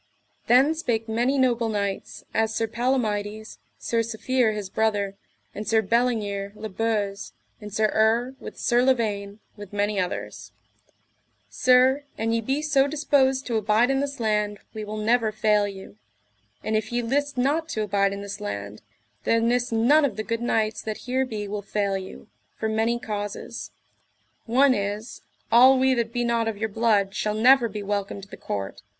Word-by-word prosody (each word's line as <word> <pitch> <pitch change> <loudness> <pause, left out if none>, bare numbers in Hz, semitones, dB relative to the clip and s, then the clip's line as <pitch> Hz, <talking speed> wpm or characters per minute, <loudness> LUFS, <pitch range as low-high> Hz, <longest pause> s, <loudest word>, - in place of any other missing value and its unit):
Then 265 +6 +5
spake 235 -8 -2
many 240 +5 +1
noble 240 -3 +2
knights, 200 -2 -3
as 220 0 +1
Sir 225 - +1
Palomides, 220 -3 -2 0.2
Sir 230 - -1
Safere 230 +1 0
his 205 -2 -4
brother, 205 -1 0 0.4
and 210 0 -6
Sir 220 0 +3
Bellingere 205 -3 0
le 220 +1 -6
Beuse, 205 -1 -2 0.3
and 210 0 -8
Sir 215 +1 +2
Urre, 230 +4 +2
with - - -9
Sir 240 0 +2
Lavaine, 215 -5 0
with 205 -2 -10
many 205 0 0
others: 180 -1 -4 1.0
Sir, 255 +2 +4
an 225 +1 0
ye 230 - +1
be 270 +6 -1
so 280 -2 +3
disposed 275 -3 +2
to 235 -2 -1
abide 215 +4 +2
in 270 - +1
this 280 -1 -3
land 210 -2 0 0.2
we 215 -1 -5
will 210 +1 -6
never 225 +1 +2
fail 210 -1 +2
you; 190 - -10 0.7
and 220 - -1
if 215 +1 -1
ye 240 0 0
list 285 +4 -1
not 300 +6 +1
to 215 -8 -2
abide 200 -1 +1
in 200 0 -5
this 200 0 -7
land 100 0 -5 0.4
there 230 - +2
nis 240 +1 +1
none 245 +8 +4
of 260 -8 0
the 215 - -2
good 230 +1 -3
knights 220 -2 0
that 215 -1 -4
here 260 +1 0
be 210 -3 -4
will 205 +1 -4
fail 200 -1 -1
you, 190 +2 -7 0.3
for 220 - -2
many 220 +2 +1
causes. 205 -3 -5 0.8
One 260 +3 +4
is, 205 +1 -4 0.3
all 255 +3 +7
we 260 0 +3
that 235 -2 -1
be 240 0 -1
not 235 -1 +1
of 220 -2 -2
your 220 +1 -2
blood 205 -3 +1
shall 210 +1 -1
never 245 +2 +5
be 210 0 -6
welcome 200 0 -3
to 195 - -11
the - - -10
court. 95 -2 -5
220 Hz, 175 wpm, -25 LUFS, 205-245 Hz, 1.0 s, all